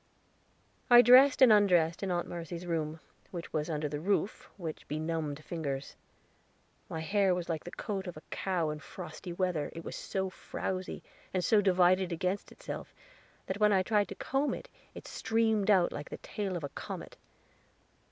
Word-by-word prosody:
I 240 0 +9
dressed 260 +2 +8
and 240 -4 +9
undressed 175 -6 +4
in 195 - -2
Aunt 175 -1 -1
Mercy's 170 +1 -6
room, 160 -2 -2 0.3
which 170 -2 -7
was 155 +1 -1
under 150 -1 -1
the 145 0 -4
roof, 200 +4 -1
with 165 -5 -6
benumbed 155 -1 -3
fingers. 140 -5 -4 0.9
My 160 - -4
hair 195 +2 +2
was 175 -1 -4
like 160 -2 -2
the - - -5
coat 195 0 -4
of 175 - -6
a 155 - -11
cow 175 -5 -1
in 150 - -5
frosty 170 +2 -8
weather; 175 -4 -1
it 165 - -6
was - - -6
so 190 -1 -3
frowzy, 185 0 -4 0.3
and 185 - +1
so 210 +4 +4
divided 185 -1 +4
against 180 +4 -2
itself, - - -8 0.5
that 190 +2 -4
when 210 0 +5
I 190 -2 +4
tried 210 0 +2
to 195 - -7
comb 270 +7 0
it, - - -10 0.3
it - - -9
streamed 220 -2 +1
out 185 -4 +5
like 145 - -6
the - - -6
tail 195 -4 -4
of 165 - -7
a 145 - -3
comet. - - -7
180 Hz, 175 wpm, -31 LUFS, 160-200 Hz, 0.9 s, I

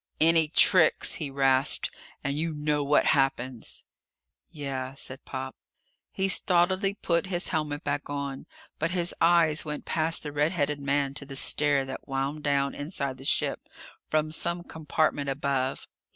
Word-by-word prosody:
"Any 165 0 +4
tricks," 165 +1 +5
he 145 - -2
rasped, 135 -1 +2 0.3
"and 140 0 -1
you 160 +1 -2
know 150 0 0
what 145 +1 +3
happens!" 130 -3 -1 0.7
"Yeah," 135 -3 -5
said 130 0 -7
Pop. 130 0 -6 0.6
He 190 - 0
stolidly 190 +2 +2
put 170 -2 0
his 180 -1 -1
helmet 150 -1 -2
back 145 0 -3
on. 140 -1 -5 0.3
But 165 - 0
his 175 0 0
eyes 165 -2 +4
went 150 -1 -6
past 160 +1 +1
the 150 - -5
red 150 +4 +1
headed 145 -3 0
man 140 0 0
to 140 - -7
the 135 - -8
stair 145 0 +2
that 135 0 -8
wound 135 +2 -2
down, 140 -1 +1
inside 140 -3 -3
the 135 - -9
ship, - - 0 0.4
from 155 0 0
some 170 +2 -1
compartment 155 -3 -1
above. 135 -1 -1
145 Hz, 150 wpm, -27 LUFS, 140-160 Hz, 0.7 s, tricks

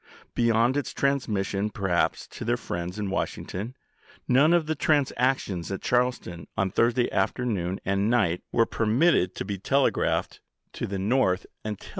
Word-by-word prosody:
Beyond 115 +2 +2
its 145 - -3
transmission 105 -7 0
perhaps 95 -4 0
to - - -8
their - - +1
friends 85 +3 -5
in 100 -2 -3
Washington, 105 +5 -3 0.5
none 140 +6 +5
of 170 -2 +3
the 155 +1 -1
transac 135 -3 +2
tions 90 -3 -5
at 95 - -4
Charleston 120 -9 -1
on 95 -1 +1
Thursday 120 +3 +2
afternoon 95 -7 -1
and 100 +2 +1
night 100 -8 +2
were 115 - +3
permitted 115 - +2
to - - -4
be 100 -1 -4
telegraphed 135 +7 +1 0.3
to - - -4
the 100 - -3
North 95 -2 +2
70 - - -18
ABKAHAM 110 - -9
LINCOLN 105 - -4
Chap. - - -13
110 Hz, 165 wpm, -26 LUFS, 95-125 Hz, 0.5 s, none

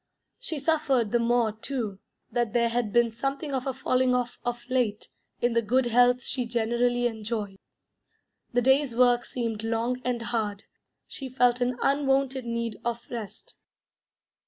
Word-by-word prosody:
She - - -4
suffered 275 -6 +1
the 240 - +3
more, 235 -1 +2
too, 220 -3 -4 0.3
that 235 -2 0
there 235 -1 +3
had 235 -2 -1
been 240 0 +3
something 275 +5 -3
of 260 0 -2
a 265 - 0
falling 255 0 +2
off 245 -1 -2
of 240 0 -4
late 245 -5 0 0.3
in 240 -1 +3
the 230 - +3
good 250 +4 +2
health 245 +1 +4
she 250 -3 -2
generally 240 +1 +1
enjoyed. 215 -3 -3 0.9
The 245 0 +1
day's 265 -1 +3
work 245 0 +4
seemed 230 -3 -3
long 230 +3 -1
and 245 -1 -1
hard; 215 -4 -2 0.4
she 270 -2 -6
felt 245 -1 +2
an 245 0 0
unwonted 270 -2 +1
need 235 -2 -3
of 235 0 -3
rest. 225 -4 -7
240 Hz, 155 wpm, -27 LUFS, 230-255 Hz, 0.9 s, health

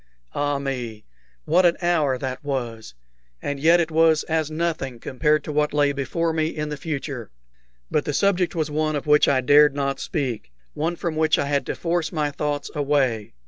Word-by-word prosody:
Ah 145 0 0
me! 125 -6 -5 0.4
what 180 +3 +4
an 175 -1 +4
hour 160 -7 +1
that 130 +3 -5
was! 120 - -4 0.4
And 145 - -4
yet 165 +4 +5
it 165 -1 0
was 160 -1 +4
as 160 -2 -1
nothing 155 -6 -2
compared 150 +6 0
to - - -5
what 150 0 0
lay 145 -1 +3
before 150 +4 -1
me 155 -1 +1
in 150 -2 -4
the 150 - -3
future. 140 -6 -5 0.6
But 150 - +1
the - - -1
subject 185 +1 +1
was 155 -2 -1
one 155 0 0
of 145 - -3
which 150 0 +5
I 130 -2 +3
dared 145 +2 +5
not 140 -1 -1
speak 125 - -3 0.2
one 165 +3 -1
from 170 -2 -3
which 155 0 +3
I - - 0
had 140 0 -1
to - - -2
force 170 -2 -1
my 150 -4 -1
thoughts 145 0 -3
away. 135 - 0
150 Hz, 190 wpm, -23 LUFS, 140-160 Hz, 0.6 s, yet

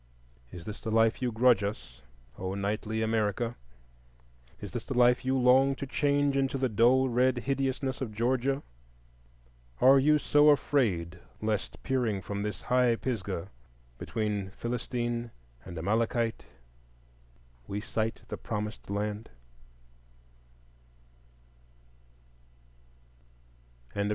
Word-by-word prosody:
Is 90 -1 -9
this 105 0 -7
the - - -4
life 115 +2 +3
you 125 -1 0
grudge 115 -1 +4
us, 65 - -5 0.4
O 95 +1 -3
knightly 105 +2 -2
America? 110 +1 0 1.0
Is 100 - -8
this 120 -3 -4
the 135 - -5
life 125 0 +4
you 130 +1 +1
long 130 +2 +4
to 140 - -5
change 145 +1 +1
into 135 0 +1
the 130 -1 0
dull 120 +5 +4
red 125 +1 +2
hideousness 135 0 -2
of 125 -5 -3
Georgia? 130 +4 0 1.2
Are 135 +2 +7
you 150 +3 +4
so 150 0 +4
afraid 95 - +1 0.2
lest 110 -1 -3
peering 125 -6 0
from 100 +1 -5
this 105 0 -4
high 125 -1 +3
Pisgah, 100 -8 -4 0.5
between 105 -3 -2
Philistine 120 0 -3 0.4
and 85 - -8
Amalekite, 115 +5 0 1.2
we 100 - -3
sight 110 0 -3
the - - -5
Promised 105 -1 -5
Land? 105 +2 -3
115 Hz, 110 wpm, -29 LUFS, 105-130 Hz, 1.2 s, Are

